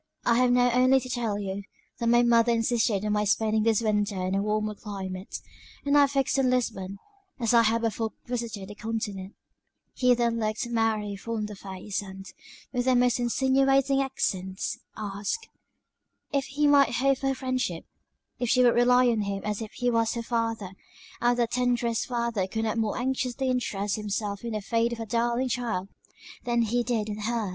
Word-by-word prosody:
"I 235 0 +4
have 250 0 +4
now 245 0 +4
only 255 +2 +4
to 255 0 -8
tell 235 -5 -1
you, 200 -1 -4 0.4
that 235 - -1
my 240 +1 +5
mother 235 0 +4
insisted 225 -3 +1
on 210 - 0
my 210 0 +1
spending 215 +1 +2
this 225 0 +2
winter 205 -2 0
in 185 - -1
a 195 - +1
warmer 215 +1 -1
climate; 195 -2 -6 0.5
and 285 0 +2
I 285 -1 +6
fixed 275 -1 0
on 260 -1 +3
Lisbon, 200 -6 -1 0.4
as 230 -1 +1
I 235 - +7
had 230 +1 +1
before 225 0 -1
visited 230 -5 -4
the - - -7
Continent." 210 -3 -5 0.6
He 250 -1 +3
then 235 -1 0
looked 215 +2 -1
Mary 220 -3 0
full 230 +3 -5
in 215 - -2
the 210 0 -7
face; 195 +1 -5
and, 195 -1 -10 0.5
with 245 -1 0
the 260 -1 +4
most 245 +1 +3
insinuating 270 +2 +2
accents, 190 -8 -2 0.2
asked 210 - -4 0.9
"if 275 -2 +1
he 295 +2 -1
might 285 -2 +5
hope 275 +1 +2
for 270 - -1
her 270 - +1
friendship? 255 -10 -2 0.5
If 245 - -1
she 255 +1 +4
would 240 -1 +5
rely 250 +1 +5
on 230 -3 +2
him 200 -1 -3
as 210 +1 -2
if 220 - -6
he 245 -1 0
was 230 0 +1
her 235 - -3
father; 225 -4 -2 0.5
and 240 0 +3
that 235 -1 +1
the - - -6
tenderest 245 -2 0
father 235 -6 -1
could 220 +3 -3
not 220 +1 -1
more 220 -2 -1
anxiously 260 0 -1
interest 210 -5 -1
himself 205 -1 -3
in 235 -1 -4
the 215 - -2
fate 230 +3 0
of 235 - -7
a 225 - -4
darling 235 +3 0
child, 225 -6 -2 0.5
than 235 -1 +1
he 235 +2 +1
did 235 -3 -1
in 210 0 -5
her's." 220 -1 -1
230 Hz, 195 wpm, -27 LUFS, 210-245 Hz, 0.9 s, I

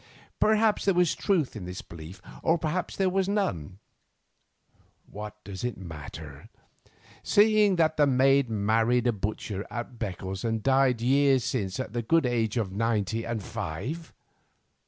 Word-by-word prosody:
Perhaps 215 0 +3
there 195 -2 +3
was 175 -2 +3
truth 175 - 0
in 100 -4 -6
this 90 +1 -6
belief, 85 +3 -11 0.2
or 165 - +3
perhaps 165 +3 -2
there 195 - +1
was 190 +1 +1
none. 95 - -1 1.3
What 105 +1 -8
does 100 0 -7
it 125 -3 -2
matter, 75 -4 -9 0.7
seeing 210 -1 +4
that 160 -2 +2
the 145 -1 +5
maid 135 0 +4
married 115 +3 +2
a 120 - +4
butcher 100 -1 -4
at 120 0 -6
Beccles 95 -2 -4
and 110 -2 -1
died 135 -3 +3
years 135 0 +4
since 100 -5 -2
at 130 -5 -4
the 120 - -1
good 165 +6 +2
age 115 -2 0
of 105 -5 -1
ninety 110 +1 0
and 115 -3 -3
five? 120 - -5
120 Hz, 150 wpm, -27 LUFS, 100-155 Hz, 1.3 s, the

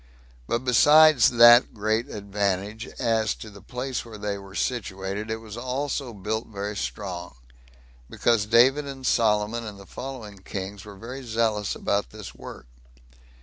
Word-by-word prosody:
But 120 +2 -1
besides 150 +1 +6
that 120 0 +7
great 110 +2 -1
advantage, 100 +1 -3
as 110 -2 +1
to 110 - -10
the 100 -1 -13
place 125 +5 -4
where 115 -2 -10
they 105 -1 -3
were 100 -1 -11
situated, 100 -3 -3
it 110 - -1
was 110 -2 -9
also 130 +1 -3
built 110 +2 -4
very 105 0 -5
strong; 90 -7 -5 0.7
because 115 -3 +1
David 130 +6 +4
and 135 -1 -8
Solomon, 110 0 +1
and 105 -3 -8
the 100 - -12
following 115 -5 -8
kings, 95 +1 -7
were 100 -1 -10
very 125 +7 -8
zealous 110 -4 -1
about 100 0 -1
this 105 -3 -10
work. - - -11
110 Hz, 150 wpm, -25 LUFS, 100-120 Hz, 0.7 s, that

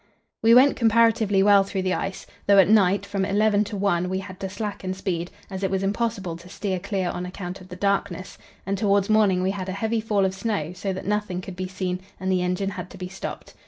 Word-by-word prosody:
We 230 +1 +6
went 270 +3 +6
comparatively 225 -3 +3
well 200 -1 +6
through 195 -1 -3
the 185 0 +1
ice, 195 -1 -3 0.2
though 200 0 +6
at 190 -3 +7
night 200 -2 +4
from 200 -1 -2
eleven 205 +1 +3
to 205 0 -5
one 180 -3 +1
we 190 - -1
had 185 -1 -7
to 190 - -4
slacken 195 -2 -4
speed, 175 -2 -3 0.2
as 190 -1 -6
it 195 - 0
was 190 0 -1
impossible 200 -3 -1
to 175 +2 -14
steer 190 -1 -3
clear 190 -1 -2
on 175 - -4
account 180 0 -6
of 185 - -14
the 180 - -7
darkness, 195 -1 -2 0.3
and 195 +1 -2
towards 200 0 +2
morning 200 -4 +4
we 190 - +1
had 190 -1 -5
a - - -2
heavy 220 +3 -1
fall 210 -3 +1
of 190 - 0
snow, 190 -5 -2
so 195 +2 -3
that 190 - -5
nothing 210 -3 -1
could 185 0 -8
be 185 +1 -4
seen, 185 -1 -3 0.2
and 190 0 -1
the 185 -1 +2
engine 180 +2 -1
had 180 -2 -7
to - - -12
be 180 0 -6
stopped. 195 - -7
195 Hz, 235 wpm, -24 LUFS, 185-205 Hz, 0.3 s, at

